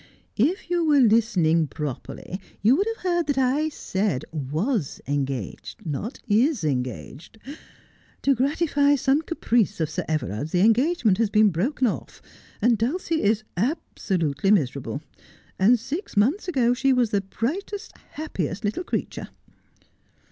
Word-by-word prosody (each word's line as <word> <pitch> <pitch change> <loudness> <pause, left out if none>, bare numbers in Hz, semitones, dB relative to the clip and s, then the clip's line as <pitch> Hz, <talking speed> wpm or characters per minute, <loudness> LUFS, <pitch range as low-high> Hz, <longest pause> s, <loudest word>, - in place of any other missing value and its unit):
' - - -43 0.2
If 380 - -10
you 350 -1 +2
were 300 -3 +4
listening 205 - +3
properly 150 +6 -6 0.2
you 230 +5 +6
would 395 +7 +1
have 455 -3 -4
heard 345 -3 +1
that 285 -2 0
I 270 +4 +2
said 190 - -2
was 155 - -2
engaged, 135 -7 -4
not 160 - -4
is 230 - +2
engaged. 130 - -4 0.9
To 275 - +4
gratify 285 +2 +2
some 275 +2 +2
caprice 235 - 0
of 160 -2 -1
Sir - - -2
Everard's 150 - -2
the 180 - +3
engagement 225 - +3
has 225 -3 +2
been 215 0 +5
broken 235 - 0
off, 230 - -3 0.4
and 235 -2 +4
Dulcie 320 +7 0
is 215 +1 +2
absolutely 190 - -1
miserable. 140 - +1 0.6
And 230 +6 +5
six 290 - -5
months 275 - +2
ago 250 -8 +2
she 265 +2 +2
was 245 -3 +2
the 200 - +2
brightest, 355 - -4 0.2
happiest 205 - -4
little 215 - -1
creature.' - - -4
225 Hz, 140 wpm, -24 LUFS, -, 0.9 s, you